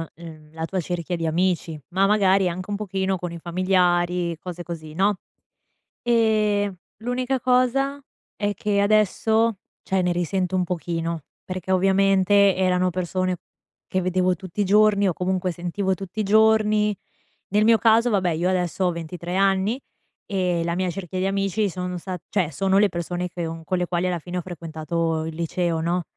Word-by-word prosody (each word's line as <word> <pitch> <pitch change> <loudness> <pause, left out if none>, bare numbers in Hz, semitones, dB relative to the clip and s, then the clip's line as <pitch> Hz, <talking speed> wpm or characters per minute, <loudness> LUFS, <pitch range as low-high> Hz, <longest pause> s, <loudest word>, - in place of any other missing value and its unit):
uhm, 155 -2 -12
la 160 0 -3
tua 185 +3 -2
cerchia 175 +1 -3
di 165 -1 -3
amici, 170 -1 0
ma 190 +2 +3
magari 195 -2 +3
anche 185 +3 -6
un 205 - -1
pochino 195 -2 -1
con 175 -1 -5
i 170 - -6
familiari, 175 -1 +1
cose 175 -1 -7
così, 160 -2 -7
no? 195 +4 +2 0.9
Ehm, 215 -4 +2 0.2
l'unica 250 +3 -1
cosa 255 +3 +2 0.4
è 205 0 -1
che 200 +1 0
adesso, 215 +1 +2 0.3
cioè 190 -1 0
ne 180 - +1
risento 180 +1 -1
un 185 - +2
pochino, 165 -2 -3 0.2
perché 185 0 -4
ovviamente 195 +1 +4
erano 185 -1 +2
persone 185 +1 -1 0.5
che 185 - 0
vedevo 185 0 +1
tutti 190 +2 -5
i - - +2
giorni 205 0 +4
o, 180 - +1
comunque, 185 +1 -1
sentivo 180 +3 -2
tutti 195 +3 -8
i - - 0
giorni. 215 0 +3 0.5
Nel 210 +2 +3
mio 230 0 +6
caso 230 +1 +4
vabbè, 190 -4 +2
io 170 +3 0
adesso 185 0 0
ho 180 - +2
23 170 +1 -5
anni, 195 +6 +2 0.5
e 180 -4 0
la 170 0 -1
mia 185 0 0
cerchia 185 0 -5
di 185 - 0
amici 195 +1 0
sono 180 0 -4
sta 185 +1 -5
cioè 180 -6 0
sono 190 +6 +1
le 210 - +5
persone 175 +1 -3
che 175 -1 -4
un 165 0 -7
con 185 - 0
le 180 - 0
quali 175 +1 0
alla 180 -1 -1
fine 175 +3 -6
ho - - -1
frequentato 165 -1 -3
il 160 0 -6
liceo, 170 0 -1
no? 175 +2 0
185 Hz, 175 wpm, -23 LUFS, 175-200 Hz, 0.9 s, mio